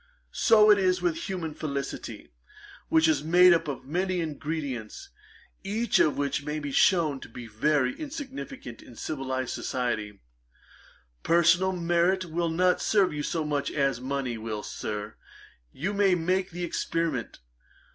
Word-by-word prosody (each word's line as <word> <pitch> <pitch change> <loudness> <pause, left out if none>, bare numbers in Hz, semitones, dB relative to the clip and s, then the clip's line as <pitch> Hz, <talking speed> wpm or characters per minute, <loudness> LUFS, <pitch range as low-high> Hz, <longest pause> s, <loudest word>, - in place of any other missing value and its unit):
So 215 -1 +6
it 205 - +5
is 185 -1 +2
with 175 -1 -2
human 170 -5 -3
felicity, 140 - -5 0.6
which 160 0 +4
is 150 -2 +2
made 175 +3 +6
up 165 - 0
of 140 -3 -5
many 180 +5 -1
ingredients, 155 - -4 0.5
each 220 +4 +1
of 150 - +3
which 140 0 -1
may 150 +1 -3
be 145 -2 -4
shewn 160 -3 +3
to - - -11
be 120 +1 -9
very 130 +4 +1
insignificant. 275 - -7
In 120 - -14
civilized 130 -2 -3
society, 110 -5 -3 1.0
personal 170 +3 +4
merit 175 +2 +1
will 170 0 -1
not 180 +2 +2
serve 200 -6 +2
you 150 - -3
so 160 +2 -2
much 145 -2 -1
as 135 -4 0
money 130 -3 -3
will. 110 -1 -5
Sir, 105 0 -5 0.5
you 190 +9 -3
may 200 -2 +3
make 185 +3 0
the 175 +1 -6
experiment. 165 -6 -2
160 Hz, 145 wpm, -27 LUFS, 135-180 Hz, 1.0 s, So